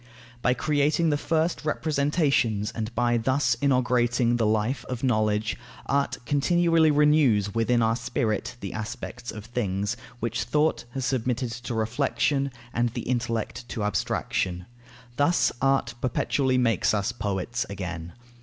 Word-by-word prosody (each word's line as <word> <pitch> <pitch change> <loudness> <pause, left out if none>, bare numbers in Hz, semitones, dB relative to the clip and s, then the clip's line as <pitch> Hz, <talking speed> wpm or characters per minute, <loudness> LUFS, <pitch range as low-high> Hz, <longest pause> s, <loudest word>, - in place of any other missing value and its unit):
By 125 +1 +2
creating 150 +3 +2
the - - +2
first 160 +3 0
representations 140 - +1
and 110 0 -4
by 120 0 +2
thus 125 +1 +2
inaugurating 125 -3 +2
the 115 -2 +2
life 110 +5 0
of 125 -1 -5
knowledge, 110 -3 +1 0.3
art 140 0 0
continually 165 +4 +3
renews 145 -9 +3
within 115 +1 +2
our 115 0 +2
spirit 115 0 -2
the 100 - -5
aspects 115 +3 -6
of 110 -1 -8
things, 105 -3 -2 0.2
which 115 0 -2
thought 150 -4 +1
has 135 -2 -2
submitted 125 -1 -1
to 120 0 -5
reflexion, 135 +4 0 0.2
and 120 0 +1
the 115 - -5
intellect 120 -1 -2
to 110 - -3
abstraction. 95 -2 -1 0.5
Thus 145 +5 +3
art 135 -3 +2
perpetually 130 +1 +1
makes 115 -4 +2
us 100 +3 0
poets 110 +1 -2
again. 85 -4 -5
120 Hz, 135 wpm, -26 LUFS, 110-140 Hz, 0.5 s, continually